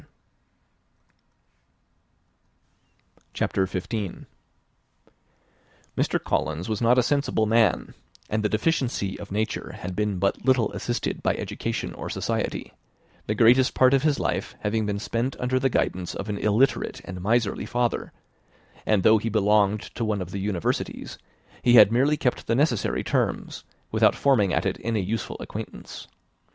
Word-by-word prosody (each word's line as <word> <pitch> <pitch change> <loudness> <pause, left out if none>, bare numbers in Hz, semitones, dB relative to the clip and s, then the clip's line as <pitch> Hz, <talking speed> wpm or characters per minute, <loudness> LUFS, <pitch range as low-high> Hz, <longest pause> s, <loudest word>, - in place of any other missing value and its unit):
CHAPTER 95 - 0
XV. 95 +1 -4 1.7
Mr. - - 0
Collins 80 +3 -1
was 110 0 -2
not 120 +2 +4
a 125 - +5
sensible 140 -6 +1
man, 110 -4 +2 0.3
and 110 +1 -1
the 105 - +1
deficiency 120 -6 -1
of 100 - -9
nature 110 +2 -2
had 90 0 -6
been 105 -1 -1
but 100 +2 0
little 130 -4 +2
assisted 120 - -3
by - - +1
education - - -4
or - - -7
society; - - -3 0.5
the 105 - 0
greatest 120 +4 +5
part 130 +1 +5
of 135 - +4
his 150 -1 +1
life - - -2
having 105 +1 0
been 100 -1 -1
spent 115 +5 -2
under 130 +1 +1
the 135 +1 +2
guidance 90 -7 -1
of 100 - -5
an 100 -1 -2
illiterate 110 +6 +1
and 90 0 -7
miserly 115 +3 0
father; 120 -1 -1 0.8
and 105 -3 +3
though 110 +2 +6
he 115 - -2
belonged 105 -1 +3
to 115 - -3
one 105 -2 0
of 90 - -11
the 100 - -4
universities, 95 -3 -3 0.4
he 120 0 +5
had 105 -2 +8
merely 140 +6 +3
kept 125 -3 -1
the 115 - +2
necessary 130 -5 +1
terms - - -1 0.3
without - - +4
forming 115 -9 +3
at - - 0
it - - -1
any 115 -1 -1
useful 105 +4 -3
acquaintance. - - -8
110 Hz, 145 wpm, -25 LUFS, 100-125 Hz, 1.7 s, had